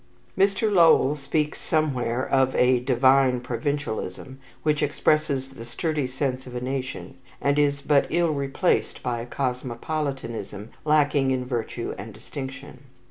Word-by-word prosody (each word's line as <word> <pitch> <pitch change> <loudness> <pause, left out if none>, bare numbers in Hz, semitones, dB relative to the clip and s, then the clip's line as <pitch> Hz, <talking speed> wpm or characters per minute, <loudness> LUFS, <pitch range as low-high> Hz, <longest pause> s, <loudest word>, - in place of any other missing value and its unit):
Mr. 200 +2 +2
Lowell 165 -6 +6
speaks 150 +1 -2
somewhere 130 -6 0
of 130 -1 +2
a 125 0 +4
"divine 130 0 +3
provincialism," 130 -1 -4 0.2
which 150 -1 +1
expresses 145 -2 +1
the 125 -4 -10
sturdy 145 +4 -2
sense 130 0 -3
of 125 - -9
a - - -1
nation, 130 +1 -5 0.2
and 140 +1 +1
is 140 -1 +1
but 145 -1 +3
ill 170 0 +2
replaced 140 +5 0
by 120 -1 -2
a 120 - -7
cosmopolitanism 125 -4 -4
lacking 145 -3 +3
in 130 -1 0
virtue 120 -1 -3
and 105 +1 -8
distinction. 130 +4 -8
135 Hz, 135 wpm, -25 LUFS, 125-150 Hz, 0.2 s, Lowell